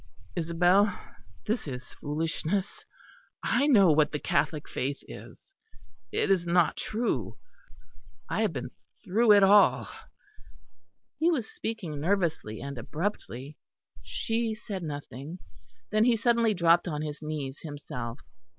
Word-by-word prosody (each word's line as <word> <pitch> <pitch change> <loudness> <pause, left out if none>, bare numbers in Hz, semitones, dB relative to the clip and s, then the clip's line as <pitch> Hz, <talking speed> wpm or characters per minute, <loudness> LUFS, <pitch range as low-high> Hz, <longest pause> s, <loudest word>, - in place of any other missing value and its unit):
"Isabel, 180 +4 +3 0.5
this 220 -5 -1
is 125 -3 -7
foolishness. 165 +6 -2 0.6
I 285 - +2
know 200 - +6
what 150 0 +3
the 150 - -1
Catholic 150 +1 0
faith 140 +2 -2
is. 390 - -12 0.6
It - - +1
is 175 -3 +2
not 170 -1 +3
true; 210 - -2 0.9
I 195 - -1
have 215 -4 +2
been 125 -4 -5 0.3
through 220 +4 +4
it 200 -1 +6
all." 200 +1 +5 1.3
He 330 - +4
was 265 -10 0
speaking 175 -10 -4
nervously 165 - 0
and 140 -2 -6
abruptly. 145 - -4 0.4
She 225 -1 -2
said 205 -3 -6
nothing. 145 0 -6 0.5
Then 215 +1 +4
he 240 -2 +4
suddenly 230 -1 +3
dropped 170 0 +4
on 150 -3 -2
his 150 0 -5
knees 150 -3 -4
himself. 145 -5 -6
170 Hz, 125 wpm, -28 LUFS, 145-210 Hz, 1.3 s, know